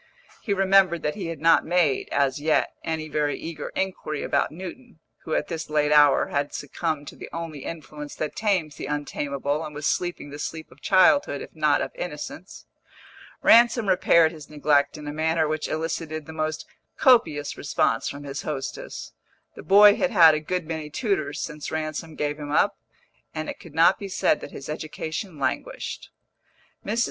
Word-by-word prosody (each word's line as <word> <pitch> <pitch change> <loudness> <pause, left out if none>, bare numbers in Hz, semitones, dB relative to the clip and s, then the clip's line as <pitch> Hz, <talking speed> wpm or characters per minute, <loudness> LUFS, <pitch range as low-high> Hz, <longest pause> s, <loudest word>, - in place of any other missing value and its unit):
He 210 - -4
remembered 190 -3 +3
that 150 - 0
he 195 -5 -5
had 165 -3 -5
not 165 +1 +5
made, 170 -6 +1
as 140 0 +1
yet, 155 +1 +1
any 160 -1 -3
very 150 -1 -1
eager 160 -3 -6
inquiry 185 -6 -3
about - - 0
Newton, 190 +7 -9 0.3
who 160 - -1
at - - -1
this 160 -2 -5
late 150 -1 +1
hour 145 -2 +5
had 140 0 -2
succumbed 145 0 -3
to - - -13
the - - -9
only 165 -3 -6
influence 150 -2 -7
that 155 - -4
tames 185 -9 0
the - - -5
untamable 145 0 -2
and 150 - -8
was 150 0 -5
sleeping 175 -5 -1
the 145 - -8
sleep 160 +1 -6
of 135 - -19
childhood, 195 - +4
if - - -13
not - - +2
of - - -5
innocence. - - -7 0.8
Ransom 235 -1 +6
repaired 170 -3 +4
his 155 -3 -12
neglect 145 -1 +2
in 150 -1 -9
a 145 - -4
manner 160 +1 +1
which 155 0 -2
elicited 155 -1 -3
the 160 - -9
most 155 -1 -3 0.3
copious 165 - +3
response 115 -5 0
from 140 +1 -8
his 140 0 -5
hostess. 135 -3 -6 0.4
The - - -10
boy 205 +1 +7
had 275 - +1
had 170 -9 +7
a 155 - 0
good 180 +2 -3
many 160 -1 -5
tutors 155 - -1
since 150 -2 -5
Ransom 155 0 -4
gave 150 0 -2
him 145 -1 -6
up, - - +3 0.6
and 155 0 -3
it - - -6
could 160 -3 -14
not 170 +3 +5
be 200 - -6
said - - +1
that - - -7
his 140 - -9
education 155 +3 -5
languished. - - -3 0.7
Mrs. 220 +3 -2
155 Hz, 180 wpm, -25 LUFS, 150-175 Hz, 0.8 s, boy